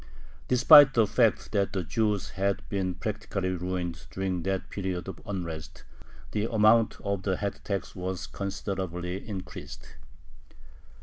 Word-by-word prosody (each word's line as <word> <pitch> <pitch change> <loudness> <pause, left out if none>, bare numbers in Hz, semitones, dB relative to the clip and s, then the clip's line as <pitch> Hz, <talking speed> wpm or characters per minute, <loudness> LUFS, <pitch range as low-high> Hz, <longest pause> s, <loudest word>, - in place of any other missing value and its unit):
Despite 135 +2 +8
the 115 -2 +5
fact 115 +2 +2
that 100 -2 0
the 95 -2 -1
Jews 105 +2 -1
had 100 0 -1
been 95 -3 -1
practically 100 -2 -3
ruined 90 -4 -4
during 95 +3 -2
that 95 +1 -2
period 95 -2 -3
of 95 -3 -7
unrest, 80 -5 -5 0.5
the 105 +2 -1
amount 110 0 +4
of 100 -2 -2
the 95 -1 -1
head 100 -1 -3
tax 100 -4 -3
was 90 0 -4
considerably 95 -2 -4
increased. 95 -3 -8
95 Hz, 130 wpm, -28 LUFS, 90-105 Hz, 0.5 s, Despite